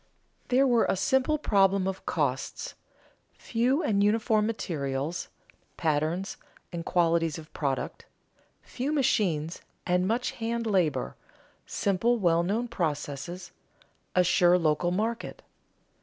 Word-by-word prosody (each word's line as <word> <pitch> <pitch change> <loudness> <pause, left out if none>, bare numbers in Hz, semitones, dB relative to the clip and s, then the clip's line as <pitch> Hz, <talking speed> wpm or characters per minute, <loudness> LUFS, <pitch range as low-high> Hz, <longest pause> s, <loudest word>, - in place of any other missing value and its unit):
There 260 +2 +4
were 240 -3 +4
a - - +1
simple 265 +9 +2
problem 195 -7 +3
of 190 0 -5
costs, - - -2 0.6
few 255 +7 +1
and 200 -1 +2
uniform 215 0 +2
materials, 150 -7 -3 0.5
patterns, 160 +5 -1 0.4
and 170 -1 -4
qualities 165 -3 +1
of 155 -1 -12
product, 140 -3 -3 0.6
few 260 +4 -3
machines 185 - +1 0.2
and 180 +1 +2
much 235 +4 0
hand 230 0 -3
labor, 165 - +1 0.5
simple 215 +5 +1
well 170 -5 +3
known 215 +7 -1
processes, 170 - -4 0.6
a 180 - +5
sure 175 0 +4
local 165 0 +1
market. 225 +5 -2
185 Hz, 110 wpm, -28 LUFS, 165-230 Hz, 0.6 s, a